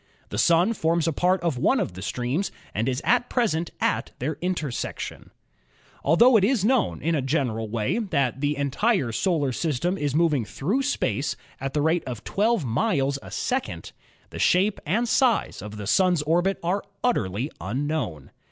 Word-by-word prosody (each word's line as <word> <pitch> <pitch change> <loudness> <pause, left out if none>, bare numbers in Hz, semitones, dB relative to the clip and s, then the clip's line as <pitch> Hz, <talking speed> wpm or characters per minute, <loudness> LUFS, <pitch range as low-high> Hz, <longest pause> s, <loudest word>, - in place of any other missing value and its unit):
The - - -3
Sun 175 +6 +4
forms 165 -4 +1
a 165 - +1
part 180 +4 +2
of 165 -7 -1
one 260 - +3
of - - -2
the 95 - -8
streams 125 - -2 0.2
and 110 +5 0
is 130 0 -2
at 245 0 +2
present 175 -10 0
at - - 0
their 145 +5 -2
intersection. 170 -8 -4 0.7
Altho 230 - +6
it 200 - +2
is 215 -2 +2
known 255 0 +1
in 165 - +1
a 150 - +1
general 125 -6 -1
way 110 - -1
that 140 - -1
the 145 0 0
entire 140 - +1
solar 145 - 0
system 165 +7 -1
is 145 -2 -1
moving 155 -6 +3
through 185 - -1
space 285 +1 -1 0.2
at 135 +1 -4
the 150 - +2
rate 160 +2 +2
of 120 -5 -6
12 215 - +1
miles 140 - +1
a - - -14
90 - - -9
ASTRONOMY - - -4
second, 260 0 -3 0.4
the - - -7
shape 195 +3 +2
and 230 +9 +1
size 240 - +2
of 105 +1 -8
the 105 - -6
Sun's 180 - +3
orbit 175 +5 +1
are 185 +4 0 0.2
utterly 120 - 0
unknown. 115 - -3
160 Hz, 180 wpm, -25 LUFS, 130-195 Hz, 0.7 s, Altho